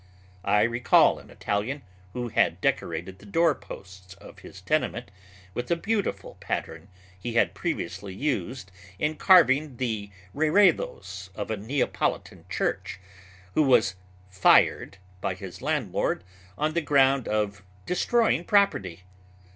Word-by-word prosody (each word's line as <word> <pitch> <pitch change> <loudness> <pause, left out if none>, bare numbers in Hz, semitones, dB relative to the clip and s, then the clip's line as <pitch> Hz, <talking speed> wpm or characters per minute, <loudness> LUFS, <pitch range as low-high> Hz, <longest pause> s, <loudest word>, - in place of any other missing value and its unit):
I 105 0 +3
recall 120 +2 +4
an - - -16
Italian, 115 +8 -3 0.3
who 120 -1 -3
had - - +2
decorated 95 +2 -2
the - - -15
doorposts 100 - -2
of - - -14
his - - -12
tenement - - -1 0.4
with 120 +3 -4
a 170 - +3
beautiful 205 +4 -2
pattern - - -4 0.3
he 115 +5 -5
had 115 - +3
previously 100 0 -4
used 120 - -3 0.3
in 150 +7 -1
carving 150 -8 +5
the 110 -5 -3 0.2
reredos 150 - +1
of 105 +1 -4
a 110 - -1
Neapolitan 125 +7 -2
church, - - -2 0.5
who - - +3
was 125 -9 +4 0.3
"fired" 95 +1 +3 0.2
by 95 - -2
his 95 -1 -9
landlord 135 - -1 0.3
on 155 +1 0
the 170 - +1
ground 135 -3 +3
of 105 -1 -1 0.2
destroying 225 0 +1
property. 100 - +1
120 Hz, 125 wpm, -26 LUFS, 100-150 Hz, 0.5 s, carving